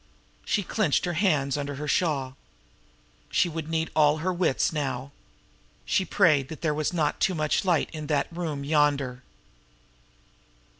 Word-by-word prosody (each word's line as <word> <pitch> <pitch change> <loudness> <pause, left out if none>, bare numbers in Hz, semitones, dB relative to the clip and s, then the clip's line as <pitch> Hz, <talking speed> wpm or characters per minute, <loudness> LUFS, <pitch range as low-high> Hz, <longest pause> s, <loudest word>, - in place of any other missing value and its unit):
She 205 - 0
clenched 185 -5 +1
her 175 - -2
hands 150 -7 +1
under 145 0 -4
her 150 +2 -5
shawl. 140 -5 0 0.9
She - - +2
would 160 -1 -5
need 160 0 -1
all 150 -1 +4
her 180 +4 -1
wits 175 -4 +1
now. 135 -3 -3 0.7
She 190 - +1
prayed 155 -10 +3
that 160 - -9
there 155 -3 +1
was 150 0 -1
not 155 -4 0
too 185 - +1
much 155 +5 0
light 175 -4 +1
in 155 -2 -6
that 145 -2 +1
room 155 -5 -3
yonder. 145 -4 +1
150 Hz, 150 wpm, -26 LUFS, 140-170 Hz, 0.9 s, all